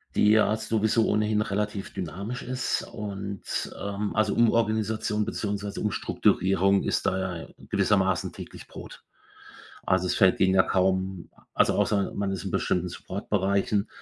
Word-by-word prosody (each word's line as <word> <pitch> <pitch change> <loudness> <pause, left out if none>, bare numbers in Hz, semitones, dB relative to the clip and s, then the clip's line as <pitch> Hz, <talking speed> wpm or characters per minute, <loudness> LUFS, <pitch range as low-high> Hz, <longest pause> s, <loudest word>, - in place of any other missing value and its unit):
die 105 - +4
ja 110 0 +4
sowieso 110 0 +1
ohnehin 105 0 +1
relativ 105 -1 -3
dynamisch 100 +7 -5
ist 130 0 -2
und, 100 -2 -5
ähm 100 +1 -3
also, 105 -1 +2
Umorganisation 110 -2 +1
beziehungsweise 100 -1 -3
Umstrukturierung 95 -1 +2
ist - - -1
da 95 -3 -1
ja - - -12 0.2
gewissermaßen 95 -3 +1
täglich - - -10
Brot. - - -11 0.8
Also, 95 0 +2
es - - 0
fällt 95 -1 +4
denen 95 0 +4
ja 95 - +6
kaum 95 -1 0 0.3
also, - - +3
außer 100 -2 +1
man 100 -1 -1
ist 95 -1 -4
in 95 - -3
bestimmten 90 +1 0
Supportbereichen, 100 +2 -1
100 Hz, 135 wpm, -26 LUFS, 95-105 Hz, 0.8 s, ja